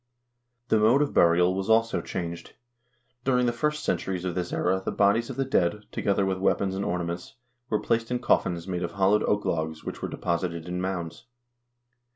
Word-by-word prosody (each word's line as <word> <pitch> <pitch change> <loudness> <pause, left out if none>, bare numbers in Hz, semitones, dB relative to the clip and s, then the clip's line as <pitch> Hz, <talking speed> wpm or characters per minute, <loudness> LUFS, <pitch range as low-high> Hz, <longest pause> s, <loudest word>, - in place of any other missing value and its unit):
The 110 - +4
mode 120 +7 +5
of 145 - -3
burial 90 +1 +4
was 95 +2 -3
also 115 +1 +3
changed. 85 -2 -6 0.7
During 125 -1 +2
the 120 - +1
first 150 +5 -1
cen - - +1
turies 95 -1 -4
of 90 - -1
this 90 -1 -3
era 95 +1 +1
the - - -2
bodies 105 +4 +2
of - - -5
the 135 - -1
dead, 105 -5 +1
together 100 -1 +1
with 95 -1 -1
weapons 95 0 +1
and 95 +1 -2
ornaments, 85 +2 -3 0.3
were 105 - +1
placed 115 0 0
in 125 - 0
coffins 85 -7 +1
made 90 -2 -2
of 85 -1 -3
hollowed 100 +2 +3
oak 105 0 0
logs 80 -1 -2
which - - -6
were - - -3
deposited 85 -1 -2
in 90 0 -3
mounds. 90 -2 -4
95 Hz, 190 wpm, -26 LUFS, 85-110 Hz, 0.7 s, mode